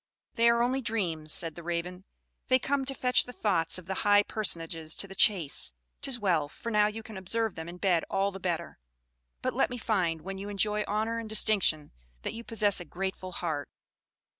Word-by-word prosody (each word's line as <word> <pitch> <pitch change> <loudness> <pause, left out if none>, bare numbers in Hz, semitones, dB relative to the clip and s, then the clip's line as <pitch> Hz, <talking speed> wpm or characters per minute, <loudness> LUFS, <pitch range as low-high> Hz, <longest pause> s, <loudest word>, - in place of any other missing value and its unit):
"They 230 0 +4
are 235 0 +3
only 260 +2 0
dreams," 175 -10 -2
said 165 0 +4
the 170 - -10
Raven. 175 +2 -4 0.4
"They 255 - +5
come 270 +1 -1
to 270 0 0
fetch 250 -1 +3
the 250 - -8
thoughts 185 -9 +2
of 185 - -9
the 190 - -3
high 205 0 +5
personages 165 -7 0
to 195 - -1
the 195 - -10
chase; 180 - +4 0.3
'tis 260 -3 +1
well, 170 -8 +1
for 230 - -7
now 210 -1 +4
you 220 +1 -6
can 220 -2 -9
observe 220 +3 -1
them 160 +1 -7
in 175 - -9
bed 180 -3 +1
all 195 +1 0
the 195 - -9
better. 175 -3 -3 0.6
But - - -1
let - - +1
me 245 - -5
find, 180 -9 -1
when 195 +1 -6
you 200 +1 -6
enjoy 210 +1 0
honor 220 +2 -1
and 225 -1 -7
distinction, 200 -8 +2 0.3
that - - -3
you 230 - -8
possess 210 -4 +2
a 175 - -7
grateful 185 +2 -5
heart." 155 -5 -4
195 Hz, 205 wpm, -29 LUFS, 170-225 Hz, 0.6 s, They